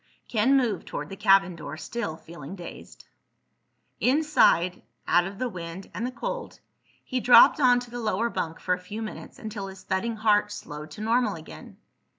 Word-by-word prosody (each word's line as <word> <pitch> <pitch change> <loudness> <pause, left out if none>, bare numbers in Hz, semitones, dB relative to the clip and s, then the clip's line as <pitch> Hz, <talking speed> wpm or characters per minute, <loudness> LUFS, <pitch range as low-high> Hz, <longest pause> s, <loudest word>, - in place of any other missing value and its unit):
Ken 245 +5 +3
moved 230 -8 0
toward 150 +1 -5
the 195 - -7
cabin 195 -2 +4
door, 155 -2 -7
still 160 0 -4
feeling 165 +1 -10
dazed. 175 -3 -11 0.9
Inside, 255 - +3 0.3
out 175 0 +4
of 195 +1 -9
the 255 - -1
wind 180 -2 -8
and 235 - -2
the - - -5
cold, - - -5 0.4
he 255 - -2
dropped 245 +4 +7
onto 245 -3 +3
the 245 - -5
lower 225 +1 0
bunk 165 0 -3
for 180 - 0
a 180 - -2
few 210 +5 -6
minutes 215 - -8
until 210 -2 -6
his 190 -1 -11
thudding 210 +4 -1
heart 210 -1 +2
slowed 150 -6 -8
to 155 - -10
normal 225 -1 +1
again. 160 -1 -11
205 Hz, 170 wpm, -26 LUFS, 175-240 Hz, 0.9 s, dropped